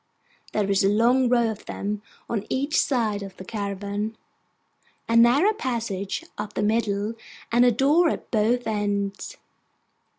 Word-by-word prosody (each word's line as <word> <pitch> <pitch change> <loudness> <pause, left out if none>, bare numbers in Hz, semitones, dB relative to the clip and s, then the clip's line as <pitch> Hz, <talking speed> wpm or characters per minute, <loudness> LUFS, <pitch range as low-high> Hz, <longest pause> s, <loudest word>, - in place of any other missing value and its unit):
There 210 -2 +1
is 195 0 +3
a 195 - +4
long 240 +4 +3
row 235 -2 +3
of 215 - -10
them 205 +1 -3 0.3
on 215 -4 -3
each 280 +4 -1
side 220 -6 0
of 195 -1 -9
the 185 - -9
caravan, 205 +1 -4 0.9
a 230 - 0
narrow 255 - +5
passage 230 - -3
up 210 0 -5
the - - -1
middle, 210 -1 0 0.4
and 240 +1 +5
a 245 - +5
door 290 +8 +3
at - - -5
both 235 +2 +1
ends. 205 -2 -2
220 Hz, 145 wpm, -24 LUFS, 205-245 Hz, 0.9 s, narrow